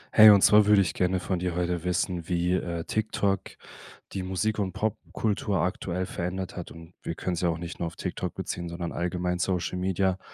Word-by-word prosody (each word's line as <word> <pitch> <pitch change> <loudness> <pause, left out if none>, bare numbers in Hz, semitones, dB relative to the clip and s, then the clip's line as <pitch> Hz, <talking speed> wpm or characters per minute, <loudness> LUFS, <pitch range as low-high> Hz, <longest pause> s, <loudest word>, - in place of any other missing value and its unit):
Hey, 110 -1 +11
und 100 -2 +7
zwar 105 0 +7
würde 105 -2 +6
ich 85 - -2
gerne 90 0 +1
von 90 +1 -2
dir 90 -1 -2
heute 90 -1 -1
wissen, 90 -1 -1
wie, 90 0 +1
äh, 85 -2 -2
TikTok 100 -2 -1 0.6
die 95 - -3
Musik 95 +4 -1
und 95 -2 0
Popkultur 105 0 -1
aktuell 90 0 -2
verändert 90 +1 -4
hat. 90 - -6
Und 85 +1 -13
wir 85 - -4
können 90 - -2
es 85 - -2
ja 90 - +2
auch 80 - -1
nicht 85 0 -7
nur 85 - -1
auf 85 - -8
TikTok - - -4
beziehen, 85 -1 -4
sondern 85 0 -4
allgemein 90 0 -2
Social 90 -1 -1
Media. 95 0 +1
90 Hz, 205 wpm, -27 LUFS, 85-95 Hz, 0.6 s, Hey